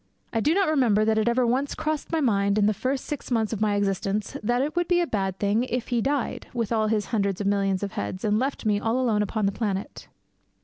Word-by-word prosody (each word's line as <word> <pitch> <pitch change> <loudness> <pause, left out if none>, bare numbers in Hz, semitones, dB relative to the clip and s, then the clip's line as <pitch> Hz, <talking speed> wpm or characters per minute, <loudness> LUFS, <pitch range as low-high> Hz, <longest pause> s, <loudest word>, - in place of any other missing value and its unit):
I - - +1
do 300 +9 +2
not 390 -1 +3
remember 240 -9 +3
that 220 0 +2
it 220 - 0
ever 245 +1 +3
once 260 +4 0
crossed 310 -1 -3
my 325 -1 +1
mind 200 -5 +2
in 210 - +4
the 215 - +3
first 260 +6 -2
six 295 - -5
months 225 -3 0
of 215 - -4
my 210 -1 +2
existence 200 +1 -1
that 240 +4 +1
it 300 +3 -3
would 350 0 +1
be 350 -1 +3
a 350 - +2
bad 195 - -2
thing 205 +4 +1
if 250 -1 -3
he 240 -2 +1
died, 275 +1 -2
with 230 -3 -1
all 220 -1 +2
his 215 -1 0
hundreds 200 -3 0
of 205 - -2
millions 195 -1 +1
of 200 - -3
heads, 185 - -4
and 210 0 +2
left 265 -1 -2
me 210 -1 +2
all 225 +4 0
alone 225 -5 +2
upon 210 +1 -1
the 195 - +2
planet. 200 -2 -4
220 Hz, 255 wpm, -25 LUFS, 205-255 Hz, -, in